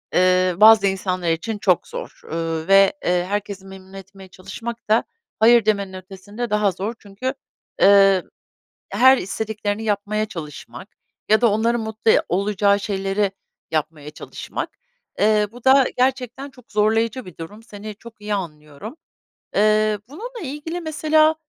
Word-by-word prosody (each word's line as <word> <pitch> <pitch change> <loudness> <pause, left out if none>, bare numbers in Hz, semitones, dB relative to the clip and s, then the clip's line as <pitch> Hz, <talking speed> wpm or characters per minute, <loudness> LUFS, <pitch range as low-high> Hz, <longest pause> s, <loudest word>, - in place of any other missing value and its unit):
ııı, 185 0 +3
bazı 215 -2 +8
insanlar 185 -3 -1
için 210 +7 -3
çok 185 -4 +1
zor, - - -8
ııı, 165 0 -3
ve, 195 0 +6
eee, 175 0 +1
herkesi 200 -1 -4
memnun 190 0 -13
etmeye 195 0 -12
çalışmak 220 +6 -8
da 220 +2 +4 0.4
hayır 230 0 +6
demenin 200 -3 0
ötesinde 195 +5 -7
daha 210 -2 +2
zor 200 +5 -4
çünkü, 215 +7 -5 0.5
eee, 195 -2 +6 0.7
her 260 +1 +5
istediklerini 215 +2 -3
yapmaya 215 0 -1
çalışmak 150 - -9 0.4
ya 215 +1 +4
da 235 -2 +4
onların 230 +2 +1
mutlu 220 0 -1
e - - +5
olacağı 200 +2 +1
şeyleri 195 0 -1 0.4
yapmaya 150 -1 -3
çalışmak. - - -7 0.5
Eee, 210 0 +3
bu 245 -1 -14
da 265 0 +6
gerçekten 260 +1 -1
çok 250 -3 -20
zorlayıcı 225 +4 +1
bir 180 - -12
durum, 205 +7 -10
seni 210 -2 -9
çok 225 +1 -15
iyi 210 0 -3
anlıyorum. 155 - -7 0.6
Eee, 215 0 +3
bununla 465 - -8
ilgili, 310 +4 -5
mesela, 310 0 +2
210 Hz, 140 wpm, -21 LUFS, 190-225 Hz, 0.7 s, bazı